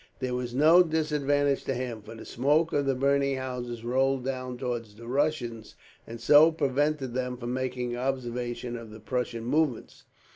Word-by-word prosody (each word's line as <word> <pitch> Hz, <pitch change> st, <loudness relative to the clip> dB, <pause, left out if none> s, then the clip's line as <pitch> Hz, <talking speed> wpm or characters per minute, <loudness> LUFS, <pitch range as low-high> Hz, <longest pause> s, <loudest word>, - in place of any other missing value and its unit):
This 130 Hz, -, -3 dB
was 125 Hz, -1 st, -3 dB
no 160 Hz, +6 st, +7 dB
disadvantage 145 Hz, -4 st, +1 dB
to 135 Hz, -, -1 dB
him, 120 Hz, -3 st, -4 dB
for 110 Hz, +2 st, -11 dB
the 110 Hz, -, -10 dB
smoke 150 Hz, +6 st, +1 dB
of 140 Hz, -1 st, +1 dB
the 135 Hz, -, +2 dB
burning 140 Hz, +1 st, +2 dB
houses 125 Hz, -3 st, -5 dB
rolled 130 Hz, +1 st, +1 dB
down 130 Hz, -1 st, -4 dB
towards 115 Hz, -4 st, -4 dB
the 115 Hz, +2 st, -12 dB
Russians, 125 Hz, -5 st, -1 dB, 0.3 s
and 115 Hz, 0 st, -8 dB
so 150 Hz, +7 st, +7 dB
prevented 145 Hz, -3 st, 0 dB
them 125 Hz, 0 st, -2 dB
from 120 Hz, 0 st, -4 dB
making 125 Hz, -1 st, -2 dB
observation 120 Hz, -1 st, -3 dB
of 115 Hz, -2 st, -8 dB
the 110 Hz, +1 st, -11 dB
Prussian 115 Hz, 0 st, -3 dB
movements. 145 Hz, -1 st, -1 dB
130 Hz, 170 wpm, -28 LUFS, 120-140 Hz, 0.3 s, no